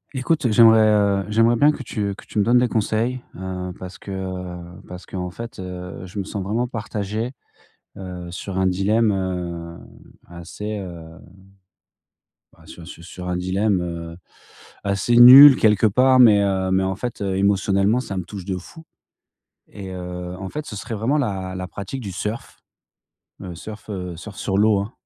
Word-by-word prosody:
Écoute, 130 -1 0
j'aimerais, 110 0 +6
heu, 100 -2 +2
j'aimerais 115 +2 +3
bien 145 +5 +4
que 150 - -7
tu 100 -4 -3
que - - -14
tu - - -3
me - - +4
donnes 120 +4 +3
des 125 - +3
conseils. 115 +3 -1
Heu, 90 0 -5
parce 90 0 -10
que, - - -12
heu, 90 -2 -7
parce 90 0 -10
qu'en 90 -1 -5
fait, 115 +5 -9
heu, 90 -1 -7
je 90 - -11
me 100 - -1
sens 100 +1 -5
vraiment 115 +6 -1
partagé, 110 0 -4 0.6
heu, 90 -2 -8
sur 95 +1 -6
un 95 - +1
dilemme, 105 +4 +2
heu, 90 -3 -4 0.6
assez, 105 +5 -6
heu, 85 -3 -10 1.3
bah, - - -22
sur 85 - -12
un - - -11
su 85 - -11
sur 90 +1 -8
un 90 - -1
dilemme, 95 +2 0
heu, 85 -1 -6 0.7
assez 100 +4 0
nul 130 +4 +11
quelque 110 -1 +3
part, 130 +5 +4
mais 110 -5 +7
heu, 95 -1 0
mais 95 0 +2
en 95 0 -1
fait, 120 0 -5
heu, 95 -1 -1
émotionnellement, 100 +3 +2
ça 100 -6 -6
me 90 - -4
touche 100 0 -8
de 95 -1 -3
fou, 160 - -12 0.8
et 95 -2 -9
heu, 90 0 -6
en 95 - -6
fait, 150 +6 -6
ce 105 - -7
serait 115 +3 -6
vraiment 115 +8 0
la 95 -8 -3
la 90 0 -5
pratique 100 +8 -7
du 100 -5 -6
surf, 105 +5 -5 0.8
le 90 -3 -8
surf, 110 +4 -10
heu, 90 -3 -5
surf 95 +4 -10
sur 95 - -2
l'eau, 105 0 +4
hein, 100 +4 -6
100 Hz, 180 wpm, -21 LUFS, 90-110 Hz, 1.3 s, nul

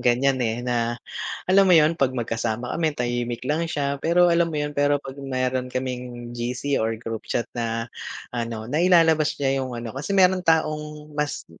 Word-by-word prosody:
ganiyan, 130 +2 +2
eh, 120 0 -1
na 120 -1 0 0.5
alam 190 +1 +5
mo 180 - +7
'yun 155 +1 +5
'pag 130 -1 +2
magkasama 115 0 -2
kami, 160 -3 0
tahimik 120 0 -2
lang 160 +4 0
siya, 140 -3 -2
pero 175 +2 +4
alam 170 0 +3
mo 155 - -4
'yun, 150 0 -1
pero 145 0 +2
'pag 140 0 -9
meron 130 -1 -1
kaming 125 -2 -5
GC 125 +3 -1
or 115 0 0
group 115 -1 -6
chat 120 - 0
na 115 -1 -2 0.5
ano, 115 -2 -3
nailalabas 160 -2 +4
niya 135 -1 +1
'yung 130 -2 -4
ano, 115 -1 -5
kasi 150 +9 -2
meron 185 -1 +5
taong 150 -2 0
mas 150 0 -2
m 80 - -20
135 Hz, 180 wpm, -24 LUFS, 120-155 Hz, 0.5 s, mo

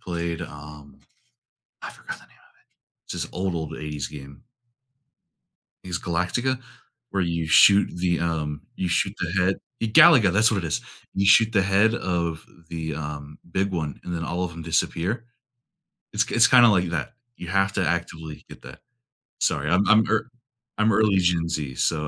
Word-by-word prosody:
played, 85 -1 -4
um, 75 -2 -11 0.8
I - - -6
forgot - - -9
the - - -19
name - - -26
of - - -26 0.4
it. - - -74
It's - - -7
this - - -9
old, 95 0 -2
old 80 -2 -4
80s 75 -4 -5
game. 70 -2 -12 1.4
Is 90 -1 -3
Galactica, 90 +10 -1 0.5
where 100 -1 0
you 85 -2 -2
shoot 100 +5 +6
the 90 -1 0
um, 75 -3 -2
you 95 - -2
shoot 85 - 0
the - - -2
head 95 +2 +1 0.2
y 115 - 0
Galaga, 120 - +6
that's 110 +4 +4
what 110 - 0
it - - -1
is. 75 - -1 0.3
You 100 - 0
shoot 110 +3 +5
the 100 -4 +3
head 100 +4 +3
of 85 -6 -2 0.2
the, 80 -3 -5
um, 75 0 -7
big 95 +2 0
one, 80 -6 -4
and 90 - -6
then 85 -1 -3
all 85 +2 -3
of 90 - -4
‘em 85 0 -8
disappear. 90 +7 -1 0.9
It's - - 0
it's 115 - +5
kinda 120 -2 +7
like 90 -4 +2
that; 85 +8 -4 0.2
you 90 - -9
have 95 +1 +1
to 95 -4 0
actively 80 -3 -4
get - - -13
that. - - -12 0.6
Sorry, 75 +2 0
I'm 95 +3 +3
I'm 110 0 +5
ear 110 +2 0 0.5
I'm 110 0 +2
early 105 -2 +3
Gen 85 -2 +1
Z, 75 -5 -4
so 75 +4 -1
85 Hz, 180 wpm, -24 LUFS, 80-100 Hz, 1.4 s, kinda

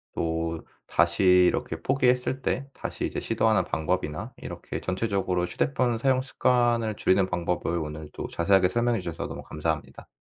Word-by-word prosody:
또 80 0 -1 0.3
다시 85 +2 +2
이렇게 90 -3 +4
포기했을 125 +3 +1
때 135 +1 -1
다시 - - -4
이제 - - -3
시도하는 110 -3 +2
방법이나 80 -2 -2
이렇게 - - -6
전체적으로 95 -2 0
휴대폰 120 +5 0
사용 130 +2 +2
습관을 120 -4 +1
줄이는 95 -1 +2
방법을 85 -1 -1
오늘 75 -1 -6
또 - - -5
자세하게 90 +1 +3
설명해 120 0 +1
주셔서 85 -2 -4
너무 - - -7
감사합니다. 80 0 -4
95 Hz, 380 characters per minute, -26 LUFS, 85-120 Hz, 0.3 s, 이렇게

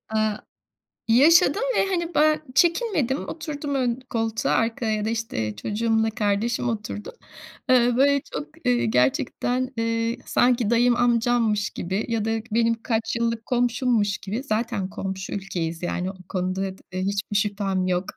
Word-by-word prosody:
Iıı, 215 -1 +1 0.7
yaşadım 320 - +5 0.2
ve - - +3
hani 345 -3 -2
ben 310 0 +4
çekinmedim, 335 - +2
oturdum 295 -2 -4
ön 250 -2 0
koltuğa, 225 -1 -1
arkaya 220 -2 0
da, - - 0
işte, 165 - -3
çocuğumla 220 - 0
kardeşim 220 +2 0
oturdu. 210 - -5 0.6
Iıı, 245 -1 +4
böyle 280 0 +4
çok, 150 0 -4 0.2
ııı, 125 - +4
gerçekten, 245 - 0
ııı, 230 0 0
sanki 245 -3 +2
dayım, 240 +1 +4
amcammış 235 -3 +2
gibi 190 +4 -3
ya 225 -2 0
da 225 - 0 0.2
benim 230 0 +1
kaç 225 -1 -1
yıllık 230 -1 -1
komşummuş 240 -4 +1
gibi, 215 +7 -5
zaten 220 -5 -2
komşu 190 -1 -5
ülkeyiz. 170 -4 -4
Yani 180 +2 -2
o - - -15
konuda 185 0 -2
dad 190 0 -5
eee, 185 0 -3
hiçbir 200 +1 -2
şüphem 195 -2 0
yok 180 +1 0
225 Hz, 140 wpm, -24 LUFS, 200-245 Hz, 0.7 s, yaşadım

